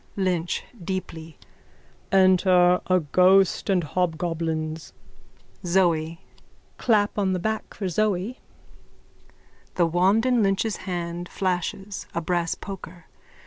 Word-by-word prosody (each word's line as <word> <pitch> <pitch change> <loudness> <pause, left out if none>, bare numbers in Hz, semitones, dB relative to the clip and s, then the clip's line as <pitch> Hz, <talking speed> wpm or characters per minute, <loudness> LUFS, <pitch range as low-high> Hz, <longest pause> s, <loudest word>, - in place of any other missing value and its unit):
LYNCH: 180 -3 -1 0.2
(Deeply.) 165 -4 -5 0.7
Enter 185 -1 +4
a 185 0 +3
ghost 185 +6 +3
and 185 -3 +2
hobgoblins. 160 -1 -2 0.7
ZOE: 170 -3 +1 0.6
Clap 210 -3 +2
on 190 -2 +1
the 185 - -1
back 220 +4 -3
for 195 - -3
Zoe. 210 +4 -1 1.4
_(The 170 -2 +2
wand 190 +7 +3
in 250 -2 +3
Lynch's 200 +2 0
hand 175 0 -4
flashes: 190 +1 -3
a - - +1
brass 170 0 -1
poker. 180 -3 -9
180 Hz, 100 wpm, -24 LUFS, 170-195 Hz, 1.4 s, Enter